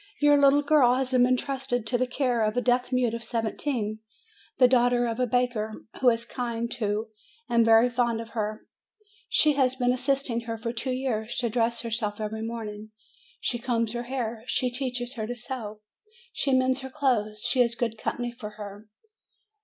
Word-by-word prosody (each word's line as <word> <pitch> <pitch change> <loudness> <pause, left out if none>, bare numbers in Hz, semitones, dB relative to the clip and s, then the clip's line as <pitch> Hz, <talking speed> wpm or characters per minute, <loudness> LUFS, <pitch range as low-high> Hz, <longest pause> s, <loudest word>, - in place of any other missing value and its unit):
Your 290 0 +5
little 285 0 +5
girl 280 -5 +5
has 260 0 -1
been 250 -1 +5
intrusted 255 -2 -1
to 245 - -1
the 255 +1 +1
care 250 -3 0
of 215 +2 0
a - - +3
deaf 250 +1 +1
mute 250 -3 +1
of 230 0 -4
seventeen, 225 -1 -2 0.6
the 255 -2 +7
daughter 245 -1 +3
of 230 0 -3
a 250 - +2
baker, 245 -3 0 0.3
who 255 - +6
is 230 0 0
kind 235 -1 -3
to 220 -1 -2 0.4
and 235 -1 +3
very 225 +1 +6
fond 240 -2 0
of 230 0 -7
her; 215 -1 -4 0.6
she 305 -1 +4
has 260 -2 +2
been 250 -1 +2
assisting 255 -2 0
her 230 -1 -4
for 230 +1 -4
two 240 +3 -3
years 240 -3 -2
to 235 -2 0
dress 235 0 +1
herself 220 -3 -2
every 220 +1 -4
morning; 220 -2 -6 0.5
she 240 - -2
combs 230 -2 -1
her 240 0 -4
hair, 235 -3 -3
she 250 -1 0
teaches 250 -1 -3
her 215 -1 -3
to 245 - -4
sew, 235 -4 -6 0.5
she 275 - 0
mends 260 0 +3
her 265 - -6
clothes, 235 -7 0
she 255 - +3
is 235 -1 +2
good 230 -2 -1
company 240 0 -2
for 230 -3 -8
her. 205 0 -9
240 Hz, 185 wpm, -27 LUFS, 225-255 Hz, 0.6 s, the